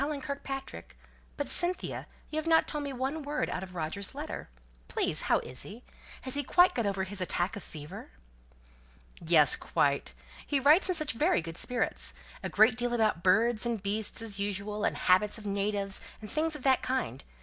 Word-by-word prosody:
But, 285 - -2
Cynthia, 355 +1 -1 0.2
you 310 - -3
haven't 325 0 +3
told 300 -1 -3
me 280 - -4
one 270 +4 -3
word 295 +1 -2
out 185 - -3
of 185 -1 -9
Roger's 175 +4 -4
letter. - - -6 0.4
Please, - - 0
how - - +5
is 125 +1 -7
he? 225 +5 -7 0.4
Has 260 - -3
he 285 - +1
quite 355 +7 +4
got 235 -4 -1
over 195 -1 -1
his 190 0 -4
attack 180 +1 -1
of 205 - -6
fever?" 160 +7 -10 1.1
"Yes, 160 -4 +7
quite. 140 -1 0 0.3
He 285 - +1
writes 305 +8 +5
in 320 -4 0
very 340 +5 +3
good 165 0 -7
spirits. 245 +7 +1 0.3
A - - -3
great 220 +2 +4
deal 245 0 0
about 215 -7 +1
birds 215 +5 +3
and 235 -4 -2
beasts, 210 +2 -1
as 205 -3 +1
usual, 205 +1 -3
habits 195 +5 +2
of 215 - -11
natives, 200 0 0 0.2
and 215 - -10
things 315 +1 0
of 290 - -9
that 265 -2 +3
kind. 255 - -2
215 Hz, 170 wpm, -30 LUFS, 190-275 Hz, 1.1 s, Yes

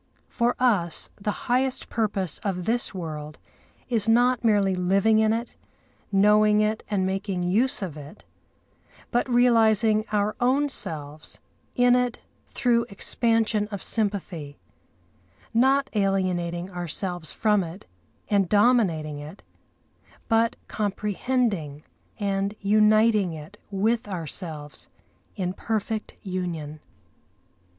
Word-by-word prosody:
For 240 0 0
us 205 -10 +1
the 205 0 -4
highest 255 +2 0
purpose 200 -7 -2
of 180 -3 -3
this 240 +3 +1
world 155 -4 -6 0.5
is 225 -3 +2
not 245 +2 +3
merely 205 -4 +3
living 195 +4 +3
in 220 0 +3
it, 230 +2 -3 0.6
knowing 210 +1 +4
it 215 +1 +1
and 195 -3 0
making 190 -1 -2
use 210 +6 +1
of 170 -6 -5
it, 150 +7 -11 0.9
but 240 +2 0
realising 225 -3 +4
our 210 0 0
own 270 +4 +2
selves 150 - -3 0.4
in 245 0 +5
it 250 -1 0 0.3
through 235 -2 +1
expansion 225 0 +1
of 200 -2 -7
sympathy; 190 -9 -3 1.0
not 270 +4 +3
alienating 185 -3 -1
ourselves 175 -1 -3
from 210 -3 +2
it 170 +3 -9 0.4
and 200 -4 +2
dominating 200 -10 +2
it, 150 +6 -10 0.8
but 225 0 +2
comprehending 205 - -2 0.4
and 200 0 -1
uniting 215 -2 +3
it 160 +6 -10
with 215 +3 0
ourselves 160 -4 -5 0.5
in 180 -1 -2
perfect 220 +1 -3
union. 170 -5 -4
205 Hz, 110 wpm, -25 LUFS, 180-225 Hz, 1.0 s, in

